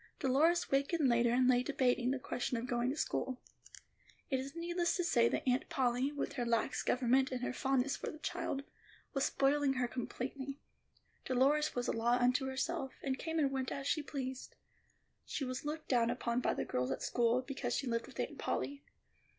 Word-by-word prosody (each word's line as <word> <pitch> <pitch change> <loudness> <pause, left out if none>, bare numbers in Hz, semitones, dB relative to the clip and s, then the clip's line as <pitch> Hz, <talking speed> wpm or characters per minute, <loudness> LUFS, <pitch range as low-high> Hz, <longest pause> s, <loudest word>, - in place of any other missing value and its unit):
Dolores 310 +6 +3
wakened 280 +2 +2
later 235 -1 +4
and 250 +1 +4
lay 250 -1 +5
debating 250 -1 +1
the 270 - +1
question 250 -1 -2
of 245 +3 -1
school. 255 -1 -1 0.9
It 265 - +2
is 275 +3 -6
needless 345 +1 0
to 355 - 0
say 235 -8 +4
that - - -2
Aunt 255 +1 +1
Polly, 255 +1 +1
with 290 - -3
her 245 - -2
lax 230 -2 +1
government 260 +1 +2
and 255 -1 -3
her - - -1
fondness 270 +1 +1
for - - -4
the - - -8
child, 320 -3 -3 0.5
was 275 -2 +1
spoiling 280 0 +2
her 255 -2 0
completely. 260 +3 -5 0.7
Dolores 275 +4 +2
was 245 0 -1
a - - +1
law 235 +2 +2
unto 255 +2 +2
herself, 265 0 -2
and 265 -2 -1
came 325 -1 -2
and 285 -3 +2
went 265 -1 -2
as 275 - -4
she 305 +2 +1
pleased. 265 -2 -5 0.7
She 275 - -3
was 255 +2 -4
looked 310 +1 -4
down 235 -3 +3
upon 240 0 -1
by - - +1
the - - -2
girls 125 0 -1
at 135 - -3
school, 240 +1 +2
because 275 +1 -3
she 275 - -1
lived 230 -2 -1
with - - -12
Aunt - - -3
Polly. 280 0 -2
260 Hz, 190 wpm, -35 LUFS, 245-280 Hz, 0.9 s, lay